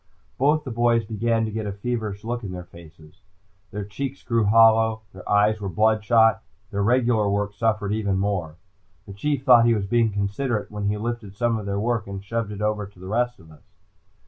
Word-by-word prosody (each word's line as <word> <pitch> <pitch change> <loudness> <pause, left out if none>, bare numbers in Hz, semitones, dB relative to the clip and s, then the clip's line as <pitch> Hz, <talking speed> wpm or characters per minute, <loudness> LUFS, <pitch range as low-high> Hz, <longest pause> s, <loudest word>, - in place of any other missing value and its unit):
Both 150 +3 +3
the 130 - -6
boys 115 -1 +2
began 115 +1 0
to 110 - -4
get 110 0 -4
a - - -2
feverish 105 -1 -4
look 120 +1 -4
in 100 - -5
their 90 -1 -6
faces. 85 0 -16 0.5
Their 105 +3 -5
cheeks 135 +6 -6
grew 115 -3 +1
hollow. 110 +1 +4
Their 95 - -11
eyes 105 +1 +3
were 100 - -3
bloodshot. 110 +3 +3 0.3
Their 100 - -1
regular 115 -1 +2
work 100 0 -1
suffered 105 -1 0
even 100 -3 0
more. 95 -5 -2 0.5
The 100 - -10
Chief 140 +6 -2
thought 125 -4 +7
he 115 - +4
was 100 -2 -2
being 115 +2 +2
considerate 105 +4 -2
when 105 -1 -4
he 105 +1 0
lifted 115 -2 -5
some 115 0 0
of 105 - -7
their 100 0 -1
work 115 0 -1
and 100 0 -6
shoved 115 0 -3
it 105 0 -5
over 105 -1 -1
to 100 -2 -20
the 95 - -11
rest 120 +5 -1
of 80 -1 -17
us. 75 - -17
110 Hz, 205 wpm, -24 LUFS, 100-115 Hz, 0.5 s, thought